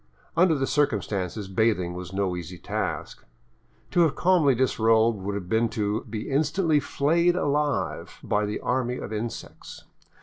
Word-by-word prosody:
Under 170 -1 +4
the 135 -2 0
circumstances 105 - -1
bathing 95 -3 +1
was 90 0 -7
no 95 -2 -1
easy 90 +1 -7
task. - - -4 0.7
To - - +1
have 165 -4 +4
calmly 170 -7 +3
disrobed 115 -3 +3
would 100 +1 -3
have 95 -3 -5
been 110 +4 +2
to 105 +2 -1
be 110 0 -5
instantly 155 +3 +2
flayed 170 +5 +2
alive 145 -3 -1
by 105 0 0
the 105 - -3
army 125 0 -1
of - - -6
insects. 110 +1 -6
115 Hz, 145 wpm, -26 LUFS, 100-145 Hz, 0.7 s, Under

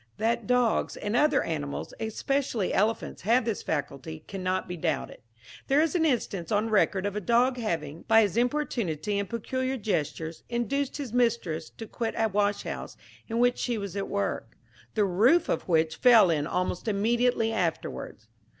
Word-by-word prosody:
That 230 +2 0
dogs 250 -2 +1
and 205 +2 -2
other 295 +2 +3
animals, 145 -3 -4
especially 225 -1 -1
elephants, 220 +3 0
have 230 +4 +3
this 225 -4 -2
faculty, 155 +1 -4
cannot 185 -1 -2
be 180 - -4
doubted. 160 -4 -2 0.5
There 275 +2 +4
is 320 0 +2
an 340 -3 +2
instance 205 - -1
on 215 +2 +1
record 200 -2 +2
of 205 0 -2
a 210 - -2
dog 245 +5 +3
having, 165 -9 -3
by 225 0 +6
his 205 -2 -1
importunity 230 - 0
and 200 - -3
peculiar 260 +3 -2
gestures, 165 - -2
induced 265 +4 -1
his 270 -6 -6
mistress 230 -10 0
to 225 - -9
quit 225 +1 -4
a 225 - +3
washhouse 205 0 -2 0.3
in 230 - -3
which 245 +1 +3
she 240 -2 -1
was 200 -2 -5
at 200 -1 -2
work, 200 0 -3 0.4
the 210 -2 +3
roof 230 - +4
of - - -1
which 160 -2 +2
fell 230 -8 +6
in 150 -2 0
almost 180 +4 -2
immediately 225 +2 +1
afterwards. 165 - -3
215 Hz, 165 wpm, -27 LUFS, 180-240 Hz, 0.5 s, by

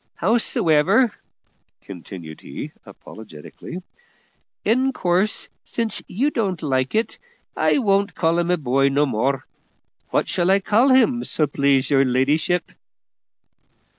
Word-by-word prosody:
Hows'ever," 200 - +2 0.7
continued 85 -4 -10
he - - -8 0.2
apologetically, 110 - -11 0.8
"in 260 +5 +2
course, 185 +1 0 0.2
since 230 -3 -3
you 270 +10 0
don't 190 - -2
like 130 0 -1
it, 220 +2 -1 0.4
I - - +2
won't 200 -5 +1
call 165 0 +1
him 175 0 -1
a 180 - +2
boy 135 -1 +1
no 140 +2 +2
more. 130 +2 -1 0.6
What - - 0
shall 175 0 0
I 195 +1 +4
call 220 +7 +2
him, 255 -2 +3
so 155 - 0
please 140 -1 +1
your 135 -1 +4
ladyship?" 140 +7 0
175 Hz, 120 wpm, -21 LUFS, 135-215 Hz, 0.8 s, I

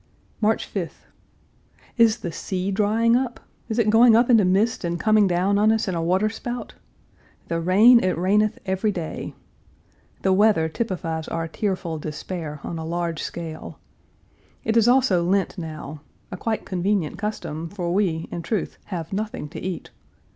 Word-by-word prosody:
March 220 +1 +1
5th. 180 -5 -5 0.9
Is 230 -1 +4
the 175 - -4
sea 185 +3 -3
drying 220 +3 +2
up? 250 -1 -1 0.3
Is 220 - -2
it 220 -3 +3
going 225 +1 +7
up 235 +2 +4
into 225 -3 +6
mist 195 +5 +1
and 170 0 -2
coming 215 -2 +4
down 185 +3 +2
on 215 +1 +4
us 225 0 0
in 190 - -1
a 165 - -1
water 185 +5 +2
spout? 240 +3 -5 0.8
The 165 - 0
rain, 215 +8 +6
it 185 -2 +1
raineth 205 +4 +2
every 190 +3 0
day. 170 -5 -5 0.9
The 190 - +3
weather 200 -5 +4
typifies 165 -5 -3
our 165 0 -3
tearful 175 -3 -3
despair, 150 0 -6
on 165 - -5
a - - -4
large 170 0 -2
scale. 160 -2 -6 0.9
It 225 - 0
is 230 -1 +5
also 245 -9 +4
Lent 190 +1 0
now 155 -3 -7 0.3
a - - -4
quite 220 +4 -3
convenient 185 -2 -1
custom, 165 -7 -4
for 175 -3 -3
we, 180 -5 0
in 170 - -4
truth, 210 +4 -3
have 170 -2 -5
nothing 215 -4 -4
to 165 - -7
eat. 185 -1 -5
190 Hz, 160 wpm, -23 LUFS, 170-215 Hz, 0.9 s, going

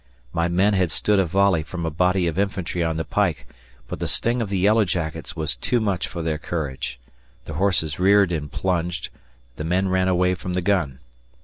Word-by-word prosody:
My 85 0 +1
men 95 +4 +3
had 95 -3 +2
stood 105 +5 +2
a 95 - +2
volley 95 -1 +3
from 85 +2 -5
a 80 - -1
body 90 +3 +2
of 85 +2 -1
infantry 95 -3 -1
on 80 -1 -1
the 80 - -1
pike, 100 -6 0 0.4
but - - -6
the - - -2
sting 120 +1 0
of 110 - -2
the 100 - 0
yellow 105 +4 +4
jackets 85 -4 -3
was 80 -4 -2
too 120 - 0
much 100 -6 -1
for 85 - -5
their 80 -2 -1
courage. 75 -7 -4 0.5
The - - -6
horses 90 -6 0
reared 100 0 +5
and 75 -4 -3
plunged, 90 -2 -1 0.5
the 75 - -4
men 90 +4 +1
ran 95 0 +2
away 90 0 +3
from 90 +1 -5
the 90 - 0
gun. 85 -9 0
90 Hz, 205 wpm, -23 LUFS, 80-95 Hz, 0.5 s, reared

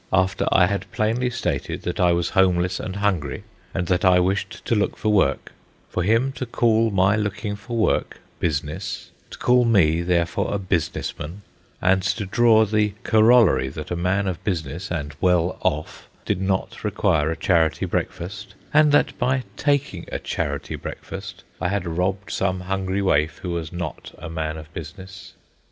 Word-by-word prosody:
—after 95 +1 +1
I 90 - +6
had 100 +2 -3
plainly 115 +4 0
stated 125 - -3
that - - -3
I 90 -1 +4
was 85 0 0
homeless 90 -1 +2
and 95 - -5
hungry, 95 -9 -1 0.3
and 90 - -2
that 90 +3 +1
I 90 -1 +6
wished 95 +2 -1
to - - +1
look 105 -2 0
for 110 - -1
work, 100 - +1 0.4
for - - -2
him 115 +8 +2
to 130 - -3
call 115 -1 +2
my 95 0 +3
looking 105 0 -2
for 115 +4 -6
work 110 - +1 0.2
"business," 75 -1 -3 0.2
to - - -10
call 125 0 +4
me 85 -8 +3
therefore 85 +2 0
a - - +1
business 90 -5 -2
man, 90 +7 -7 0.4
and 95 +1 +3
to 100 +3 -1
draw 110 +2 +4
the 105 -1 +1
corollary 110 - +5
that 75 +4 -8
a - - 0
man 90 +3 0
of 90 -4 -4
business, 85 -2 -3
and 75 -4 -4
well 90 -1 +2
off, 75 +1 -2 0.2
did 90 - -1
not 95 0 -2
require 95 -7 +1
a 80 - -2
charity 80 -4 +2
breakfast, 100 +5 -4 0.2
and 150 0 +6
that 145 - +3
by 130 +1 +1
taking 140 - 0
a - - -1
charity - - -3
breakfast 95 -1 -8 0.2
I - - +1
had 100 0 -1
robbed 90 +4 -2
some 95 -1 -1
hungry 95 +1 -2
waif 80 -4 +2
who 90 - -3
was 85 -2 -3
not 85 -3 -6
a 80 - -8
man 80 -1 -3
of 80 +1 -11
business. 95 +4 -9
95 Hz, 175 wpm, -23 LUFS, 85-105 Hz, 0.4 s, I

